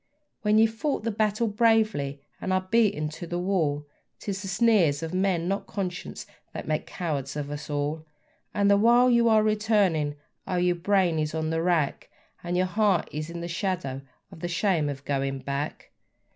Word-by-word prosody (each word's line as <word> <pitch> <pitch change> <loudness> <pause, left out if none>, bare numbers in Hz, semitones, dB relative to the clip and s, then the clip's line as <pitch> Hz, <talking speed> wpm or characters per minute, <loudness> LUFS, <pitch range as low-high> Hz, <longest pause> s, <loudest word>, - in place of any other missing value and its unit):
When 210 -2 +2
we've 220 0 +4
fought 275 +2 -2
the 230 - 0
battle 215 +1 +1
bravely 215 -11 +2 0.2
and 190 - -2
are 185 0 0
beaten 210 -10 +3
to 170 +3 -8
the 175 - -3
wall, 165 -6 0 0.3
'Tis 195 -1 -4
the 195 - -6
sneers 180 -7 +3
of 165 +1 -4
men, 185 -2 +1
not 195 +2 -2
conscience, 185 -1 -5 0.3
that - - -6
make 155 0 -1
cowards 145 -6 -3
of 145 -1 -4
us 145 0 -6
all; 150 +2 -2 0.4
And 200 -1 +1
the 200 0 +6
while 240 +4 +5
you 235 -1 +4
are 215 -1 +5
returning, 205 -9 +2 0.3
oh! 185 - -1
your 180 0 +2
brain 180 -3 +2
is 155 0 -2
on 160 0 -1
the 165 0 0
rack, 165 -5 0 0.3
And 175 +1 -1
your 185 - +3
heart 195 -2 +1
is 155 +2 -4
in 170 0 -6
the 170 - -4
shadow 170 -7 -2 0.3
of - - -12
the 175 - -3
shame 170 -3 +1
of 140 0 -6
going 135 -1 -1
back. 140 +3 -4
180 Hz, 185 wpm, -26 LUFS, 155-210 Hz, 0.4 s, the